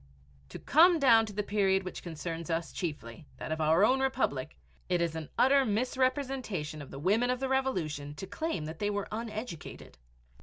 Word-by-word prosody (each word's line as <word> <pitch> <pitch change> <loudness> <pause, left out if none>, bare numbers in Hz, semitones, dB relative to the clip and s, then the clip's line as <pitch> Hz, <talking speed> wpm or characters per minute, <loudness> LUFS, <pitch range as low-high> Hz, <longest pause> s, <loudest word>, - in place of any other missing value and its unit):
To - - -7
come 340 +3 +5
down 230 -6 +5
to 210 - -8
the 210 +1 -2
period 195 -2 +2
which 185 - -6
concerns 165 0 -6
us 165 0 -2
chiefly, 150 -4 -5
that - - -6
of 160 0 -1
our 160 +6 +5
own 260 +4 +3
Republic, 155 - -1 0.3
it 180 -1 +2
is 170 -1 0
an 160 -2 -6
utter 275 +1 +5
misrepresentation 250 - -1
of 140 - -10
the - - -9
women 210 - +2
of 250 0 0
the 265 - -1
Revolution 160 - -1
to 190 - -6
claim 205 - -3
that 160 +1 -7
they 205 - 0
were 205 -1 -2
uneducated. 215 - -7
195 Hz, 185 wpm, -30 LUFS, 160-255 Hz, 0.3 s, come